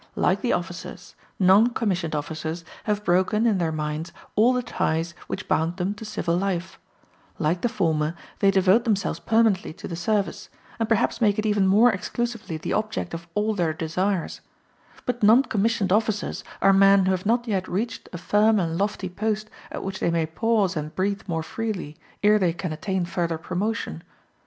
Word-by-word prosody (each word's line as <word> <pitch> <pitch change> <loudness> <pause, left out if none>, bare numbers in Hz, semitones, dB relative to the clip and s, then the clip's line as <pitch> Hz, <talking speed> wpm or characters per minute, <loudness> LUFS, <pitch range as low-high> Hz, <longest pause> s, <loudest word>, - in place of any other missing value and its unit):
Like - - +1
the - - 0
officers, - - -5 0.2
non 205 +6 +5
commissioned 180 -8 -1
officers 160 +3 -4 0.2
have 210 -1 -1
broken, 190 +5 +2
in 215 -5 +3
their 165 -2 0
minds, 155 +1 -3 0.2
all 230 +4 +5
the 250 -1 0
ties 165 -5 -1
which 190 - -5
bound 165 +3 0
them 190 +2 -1
to 210 - -10
civil 190 -5 -1
life; 185 0 -2 0.6
like 170 0 0
the 240 - +1
former, 165 -7 0 0.2
they 200 - +4
devote 195 +3 +4
themselves 210 -5 0
permanently 220 -6 +2
to - - -9
the 170 - -5
service, 205 +3 -1 0.3
and 225 -1 -1
perhaps 225 +1 +1
make 205 -3 +3
it 215 - -1
even 205 -2 +2
more 220 +6 +6
exclusively 225 -2 -3
the 155 - -3
object 215 -5 -2
of 170 +1 -6
all 210 +1 +1
their 170 -5 0
desires: 170 +3 -2 0.6
but 245 -1 -2
non 225 +5 +6
commissioned 210 -5 +1
officers 215 -1 0 0.2
are 195 - +6
men 195 0 +6
who 190 - +2
have 185 +1 -1
not 240 +2 +1
yet 190 -4 -1
reached 225 +6 -3
a 175 - -5
firm 210 +4 +3
and 165 -1 -1
lofty 200 -1 -1
post 215 +3 -2 0.2
at - - -5
which 190 0 -4
they - - +1
may 165 -1 +1
pause 200 +3 +1
and 155 0 -4
breathe 195 +1 0
more 165 -3 -2
freely, 200 -6 -4 0.3
ere 210 +1 +5
they 175 -4 +2
can 175 -2 -4
attain 185 +3 -2
further 170 -1 -2
promotion. 180 - -3
195 Hz, 180 wpm, -24 LUFS, 170-215 Hz, 0.6 s, more